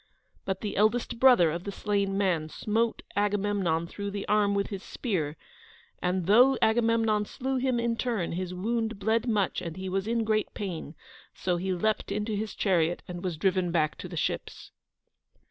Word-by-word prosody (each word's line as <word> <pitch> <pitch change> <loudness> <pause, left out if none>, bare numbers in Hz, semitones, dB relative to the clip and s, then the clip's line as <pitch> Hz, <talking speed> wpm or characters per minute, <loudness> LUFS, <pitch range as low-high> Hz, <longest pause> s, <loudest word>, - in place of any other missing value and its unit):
But 190 -1 -2
the 205 -2 -4
eldest 230 +3 +1
brother 245 -12 +6
of 170 +2 -4
the 200 - -4
slain 200 -1 -1
man 175 -6 +1
smote 225 +6 -1
Agamemnon 205 -5 +1
through 200 +4 -5
the 200 0 -5
arm 205 -1 +3
with 200 0 0
his 195 -2 -5
spear, 165 - -3 0.6
and, 180 0 0
though 245 +8 +6
Agamemnon 225 -2 +2
slew 265 +4 -3
him 255 -1 +1
in 235 0 0
turn, 230 -7 -1
his 180 +1 -3
wound 225 +4 -2
bled 220 +4 +1
much 210 -5 +1
and 170 0 -6
he 190 0 -4
was 195 +2 -1
in 230 0 +1
great 215 -1 0
pain, 175 -6 -5 0.4
so 180 -1 0
he 190 +2 -2
leaped 210 +4 0
into 210 +1 -1
his 210 0 -3
chariot 175 -4 +1
and 175 0 -6
was 180 -4 -2
driven 185 +1 +1
back 155 -3 +1
to - - -6
the - - -7
ships. - - -3
200 Hz, 180 wpm, -28 LUFS, 180-220 Hz, 0.6 s, brother